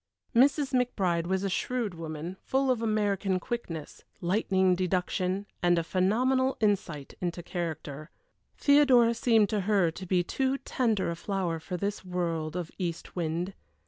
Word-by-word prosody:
Mrs. 275 +2 +4
McBride 190 -9 +1
was 190 +1 0
a - - +1
shrewd 230 +1 -1
woman, 165 +1 -6
full 265 0 +1
of 240 -3 0
American 205 -4 +1
quickness, 180 - -5 0.2
lightning 190 0 +2
deduction, 185 +1 -1 0.2
and 175 -1 +4
a 170 - +1
phenomenal 250 +10 +2
insight 180 -9 -1
into 175 -1 -3
character. 160 -4 -5 0.5
Theodora 265 -5 +5
seemed 225 -3 +3
to 215 - 0
her 195 -4 +2
to 185 +3 -8
be 180 0 +2
too 265 +8 0
tender 225 -10 0
a - - -3
flower 180 -2 -2
for 180 +3 -5
this 200 +2 -3
world 170 -3 -2
of 175 -3 -4
east 170 -3 -4
wind. 175 +2 -2
190 Hz, 145 wpm, -29 LUFS, 170-225 Hz, 0.5 s, Theodora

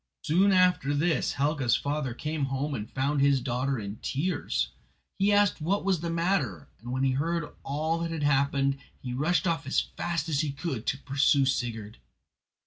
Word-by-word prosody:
Soon 190 +6 +3
after 180 -6 +3
this 155 -1 +1
Helga's 140 -3 +1
father 140 -4 -2
came 150 +1 -2
home 135 +2 -2
and 110 -5 -4
found 140 +2 0
his 140 -1 +4
daughter 130 +2 -1
in 100 -1 -5
tears. 145 - -1 0.5
He 200 +2 +3
asked 205 -4 +3
what 190 +5 0
was 190 -4 +2
the 170 +1 -3
matter, 165 - -1
and 120 +4 -7
when 130 +1 -1
he 135 - +3
heard 160 +4 -1
all 155 +4 -1
that 170 0 -2
had 165 -2 -3
happened, 140 -1 +2 0.2
he 125 -1 -5
rushed 155 +9 +1
off 165 -6 -1
as 140 - +2
fast 170 -3 -3
as 150 -4 0
he 150 -2 -1
could 140 -6 -4
to 135 - +1
pursue 140 0 +2
Sigurd. 115 - -2
145 Hz, 180 wpm, -28 LUFS, 135-165 Hz, 0.5 s, his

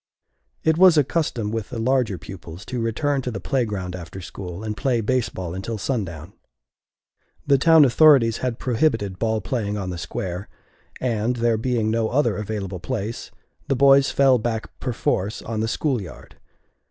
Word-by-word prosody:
It 160 +1 +2
was 185 -3 +7
a 150 - +6
custom 125 -8 -2
with 110 -2 -3
the 125 - -6
larger 120 -4 +1
pupils 85 0 -10
to 125 -2 -4
return 135 +5 0
to 125 - -4
the 110 -5 -5
playground 100 -6 -2
after 90 +1 -8
school, 90 +1 -8
and 110 -1 -3
play 120 +3 0
baseball 110 -7 -2
until 95 +5 -4
sundown. 95 - -4 1.1
The 140 -2 +4
town 160 +1 +7
authorities 130 -4 +5
had 125 -3 -2
prohibited 115 -7 0
ball 110 -1 0
playing 105 +1 -2
on 95 -2 -3
the 90 - -5
Square, 90 +2 -5 0.5
and, 120 -1 0
there 120 -1 +2
being 115 -1 0
no 115 -1 0
other 125 -4 +1
available 100 -3 -4
place, 115 +2 -4 0.4
the 135 - +1
boys 135 +1 +5
fell 135 -2 +4
back 110 0 -3
perforce 110 -4 -1
on 110 -1 -4
the 110 - 0
school 130 0 -1
yard. 90 - -11
115 Hz, 165 wpm, -23 LUFS, 100-130 Hz, 1.1 s, was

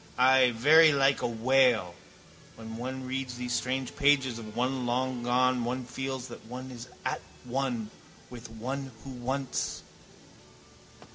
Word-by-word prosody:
Ay, 130 0 +6
very 155 +7 +7
like 135 0 +3
a 125 - +1
whale. 120 -5 +3 0.6
When 110 0 -8
one 130 +2 -5
reads 130 -1 -3
these 125 0 -3
strange 130 +1 -2
pages 135 -4 +3
of 110 -1 -9
one 125 0 -1
long 125 0 -1
gone 125 +1 +2
one 125 +1 -3
feels 130 +1 -4
that 120 - -10
one 130 +2 -7
is 120 0 -9 0.2
at - - -1 0.2
one 125 -4 -2 0.4
with 120 -1 -9
one 130 +4 -5
who 135 - -8
once... 130 +2 -3
125 Hz, 140 wpm, -29 LUFS, 120-130 Hz, 0.6 s, very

